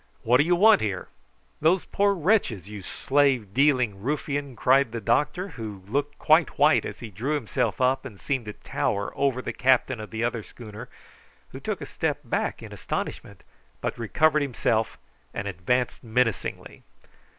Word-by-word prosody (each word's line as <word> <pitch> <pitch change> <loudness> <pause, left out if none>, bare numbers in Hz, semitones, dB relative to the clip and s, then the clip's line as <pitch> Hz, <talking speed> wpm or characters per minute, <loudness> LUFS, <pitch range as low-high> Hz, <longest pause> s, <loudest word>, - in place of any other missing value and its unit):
"What 120 +2 +5
do 145 - +4
you 175 +3 +3
want 215 +5 +6
here?" 100 -4 -3 0.5
"Those 170 +4 +3
poor 200 0 +2
wretches, 160 - +1
you 105 -1 -8
slave 130 -1 +1
dealing 125 -7 +2
ruffian," 140 +1 -2
cried 130 +1 +3
the 115 - -2
doctor, 150 - 0
who 110 - -8
looked 145 +5 -2
quite 155 +2 +3
white 150 +2 +4
as - - -7
he 115 -3 -7
drew 125 +11 -2
himself 130 -8 -1
up 130 +1 +2
and 110 -8 -10
seemed 135 -5 -2
to 105 - -6
tower 100 0 -2
over 130 -2 0
the - - -4
captain 130 -1 +2
of 110 - -7
the 110 0 -3
other 120 -1 -1
schooner, 110 -1 -10 0.6
who - - -8
took - - -4
a - - -4
step - - -2
back - - -2
in - - -9
astonishment, - - -5 0.4
but - - -3
recovered 150 +7 +2
himself 115 -5 0 0.4
directly - - -4
and 100 - -4
advanced 110 +9 -1
menacingly. 115 -2 -1
125 Hz, 170 wpm, -26 LUFS, 110-145 Hz, 0.6 s, want